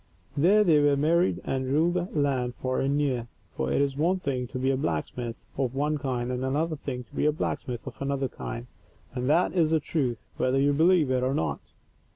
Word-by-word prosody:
There 190 +9 +5
they 160 -6 +5
were 145 -1 +3
married, 170 +5 +2
and 130 -1 -2
ruled 155 +6 +2
the 180 -1 0
land 130 -4 0
far 130 0 -2
and 140 +2 +1
near. 130 -5 0 0.3
For 65 - -1
it - - +2
is 140 -1 -1
one 170 +6 +2
thing 130 -7 -2
to 130 - -6
be 130 +1 +1
a - - +1
blacksmith 115 - -3
of 130 -1 0
one 150 +2 0
kind, 125 -3 -2
and 125 0 -2
another 155 +5 0
thing 130 -4 -5
to - - -28
be - - +2
a - - +5
blacksmith 125 -5 -3
of - - -9
another 140 -1 0
kind, 120 -1 -6 0.5
and 125 0 -2
that 170 +4 +3
is 165 -4 +3
the 160 0 +3
truth, 135 -6 -1 0.2
whether 130 +1 +2
you 145 +1 +3
believe 160 -2 +4
it 130 -1 +2
or 130 +2 0
not. 80 - -1
140 Hz, 215 wpm, -27 LUFS, 125-155 Hz, 0.5 s, There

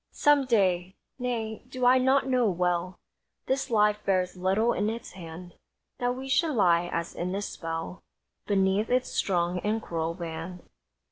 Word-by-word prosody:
Some 290 -2 +4
day! 190 -6 +1 0.2
Nay, 230 -3 -3
do 255 -1 -2
I 255 +1 +6
not 265 +2 +3
know 250 -4 +3
well 180 0 -1 0.5
This 270 +1 -1
life 210 -2 +2
bears 185 -2 0
little 195 +6 +1
in 205 +1 0
its 230 +1 -6
hand 175 -1 -10 0.5
That 245 0 0
we 265 +1 -7
should 300 +2 +2
lie 175 -4 +3
as 170 0 -3
in 180 +2 -3
a 200 - -2
spell 165 -1 -5 0.5
Beneath 195 +1 +2
its 255 0 +1
strong 175 -1 0
and 215 +4 0
cruel 165 -4 -3
band. 170 +1 -7
195 Hz, 155 wpm, -27 LUFS, 175-245 Hz, 0.5 s, I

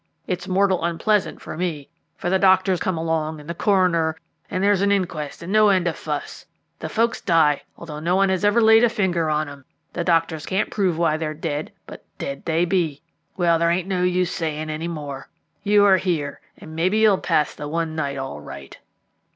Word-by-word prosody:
It's 180 0 -4
mortal 190 -2 +2
unpleasant 195 +5 0
for - - -7
me, 160 -5 -3 0.3
for 175 - -2
the 190 - +3
doctors 190 -1 +4
come 185 -1 -1
along, 160 -1 -2
and 150 - -13
the 170 - -3
coroner, 170 -4 +2 0.3
and 185 - -2
there's 200 -1 +3
an 200 0 +2
inquest 170 -7 -2
and 185 +4 -4
no 215 -1 +5
end 185 -3 +2
of 165 - -1
fuss. 150 -2 -5 0.4
The - - -5
folks 230 +1 0
die, 160 -4 +3 0.2
although 155 -3 -8
no 170 +4 0
one 195 0 +3
has 190 0 0
ever 205 +3 +4
laid 225 +1 +6
a 240 - +5
finger 175 -7 0
on 155 0 0
'em; 140 -1 -11 0.3
the 170 - -2
doctors 165 -3 0
can't 190 +2 -1
prove 185 -6 0
why 165 -2 +2
they 160 0 -3
are 155 - -5
dead, 150 -1 -4
but - - -11
dead 140 0 -6
they 165 +1 +1
be. 170 -5 -1 0.3
Well, 170 -2 +3
there 170 0 +2
ain't 175 +2 0
no 185 -2 -1
use 180 0 +1
saying 155 -1 -3
more. 145 -4 -7 0.3
You 205 0 +4
are 195 -2 +6
here, 165 -7 -2 0.2
and 160 0 -11
maybe 185 +6 +1
you'll 215 -3 +4
pass 150 - +1
the 145 - -7
one 160 +1 -2
night 140 -3 -2
all 135 - -5
right." 70 -1 -10
170 Hz, 205 wpm, -22 LUFS, 155-190 Hz, 0.4 s, laid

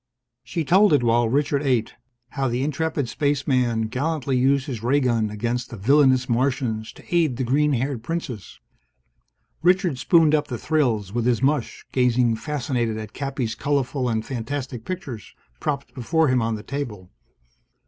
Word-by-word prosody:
She 155 +6 -3
told 190 +4 +5
it 140 - +3
while 115 0 +3
Richard 140 +2 +1
ate: 125 -6 0 0.4
how 135 +1 -1
the 120 +2 -1
intrepid 150 -1 -1
Spaceman 130 -3 0
gallantly 135 +3 -1
used 135 +2 +2
his 125 -8 -5
ray 130 +5 +2
gun 115 -5 +1
against 120 +3 -3
the 115 - -8
villainous 130 +3 +4
Martians 120 -3 -1
to - - -15
aid 155 -8 +2
the 130 - -1
green 145 +4 +2
haired 130 -1 -1
Princess. 125 - -5 1.0
Richard 180 -4 +2
spooned 160 -1 +4
up 150 -1 +2
the 120 - -4
thrills 115 - 0
with 120 0 0
his 125 0 +1
mush, 145 +2 0
gazing 125 -2 +2
fascinated 120 -5 -2
at 110 -1 -7
Cappy's 135 -4 -3
colorful 135 0 -1
and 110 -1 -1
fantastic 125 -1 -5
pictures, 130 - -6 0.2
propped 140 -4 -3
before 155 +5 +1
him 130 -1 +2
on 115 0 0
the 105 - -8
table. 115 -10 -6
130 Hz, 160 wpm, -23 LUFS, 115-145 Hz, 1.0 s, told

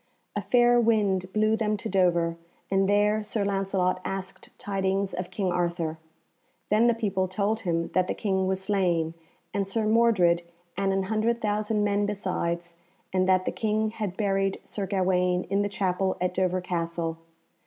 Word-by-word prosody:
A - - 0
fair 240 -1 +4
wind 200 -5 +1
blew 215 +1 +2
them 215 -1 0
to - - -5
Dover, 175 -3 +2 0.4
and 195 0 +2
there 210 +1 +3
Sir 210 -1 -1
Lancelot 195 -2 0
asked 195 0 -6
tidings 195 -3 -1
of 180 0 -4
King 190 -3 -1
Arthur. 170 -2 -1 0.7
Then 215 +3 +4
the 235 - +3
people 200 -4 0
told 205 +3 -1
him 170 -5 -1
that 185 0 +1
the - - -2
King 190 -3 0
was 190 0 0
slain, 180 -5 0 0.4
and 195 -1 -1
Sir 220 +2 0
Mordred, 215 -7 +4 0.3
and 195 0 0
an 195 0 +1
hundred 220 +4 0
thousand 210 0 0
men 205 0 +1
besides, 175 -4 -3 0.4
and 185 0 +2
that 185 0 +3
the - - 0
King 215 0 0
had 210 -4 -4
buried 195 -2 0
Sir 200 -2 -4
Gawaine 180 -2 +1
in 200 +1 +2
the 205 - 0
chapel 190 -1 0
at 180 0 0
Dover 185 0 0
Castle. 170 -2 -3
195 Hz, 165 wpm, -27 LUFS, 180-210 Hz, 0.7 s, fair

